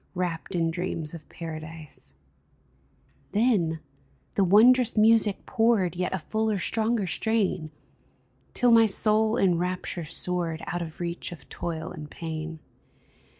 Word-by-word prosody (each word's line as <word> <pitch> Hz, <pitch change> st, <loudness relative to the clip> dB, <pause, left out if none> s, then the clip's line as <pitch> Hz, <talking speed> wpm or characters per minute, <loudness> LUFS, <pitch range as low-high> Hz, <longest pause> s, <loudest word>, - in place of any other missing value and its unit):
Wrapped 180 Hz, 0 st, -3 dB
in 165 Hz, -1 st, +1 dB
dreams 165 Hz, -3 st, -4 dB
of 160 Hz, -3 st, -11 dB
Paradise! 155 Hz, -, -9 dB, 1.2 s
Then 200 Hz, -8 st, +1 dB, 0.5 s
the 200 Hz, -, +2 dB
wondrous 230 Hz, +5 st, +5 dB
music 220 Hz, -1 st, +4 dB
poured 225 Hz, -7 st, +1 dB
Yet 180 Hz, +1 st, -2 dB
a 190 Hz, -, -1 dB
fuller, 215 Hz, +5 st, -1 dB
stronger 220 Hz, +2 st, 0 dB
strain, 190 Hz, -3 st, 0 dB, 0.9 s
Till 245 Hz, -1 st, +4 dB
my 225 Hz, -1 st, +6 dB
soul 215 Hz, +2 st, +3 dB
in 180 Hz, -6 st, +2 dB
rapture 180 Hz, -1 st, -3 dB
soared 165 Hz, 0 st, 0 dB
Out 175 Hz, -, -3 dB
of 165 Hz, 0 st, -7 dB
reach 175 Hz, 0 st, -3 dB
of 165 Hz, -5 st, -11 dB
toil 160 Hz, -2 st, -5 dB
and 150 Hz, -1 st, -9 dB
pain 160 Hz, 0 st, -6 dB
180 Hz, 125 wpm, -26 LUFS, 165-215 Hz, 1.2 s, my